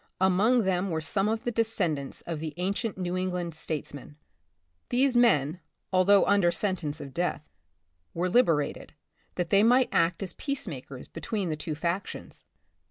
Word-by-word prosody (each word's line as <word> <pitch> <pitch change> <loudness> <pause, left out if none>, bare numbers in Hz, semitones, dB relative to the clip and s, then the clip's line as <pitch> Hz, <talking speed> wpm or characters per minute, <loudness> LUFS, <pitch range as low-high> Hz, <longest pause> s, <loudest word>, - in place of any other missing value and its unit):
Among 200 +6 +3
them 190 0 0
were 160 -2 -1
some 195 +6 0
of 225 +1 -2
the 240 - -1
descendants 190 - -1
of 165 -3 -5
the 155 -1 -5
ancient 200 +4 -2
New 180 -1 -2
England 180 -2 -2
statesmen. 150 -2 -6 0.7
These 255 +1 +2
men, 180 - +3 0.3
although 195 +2 +5
under 190 -3 +4
sentence 170 -7 -2
of 140 -3 -8
death, 170 -3 -2 0.7
were 175 +2 0
liberated, 170 - +1 0.4
that 175 -2 -2
they 200 - +6
might 250 +4 +4
act 165 +3 +1
as 185 -3 -5
peacema 205 - -4
kers 130 -2 -10
between 200 -5 -3
the 155 - -1
two 155 0 -5
factions. 170 +5 -4
180 Hz, 155 wpm, -28 LUFS, 160-205 Hz, 0.7 s, they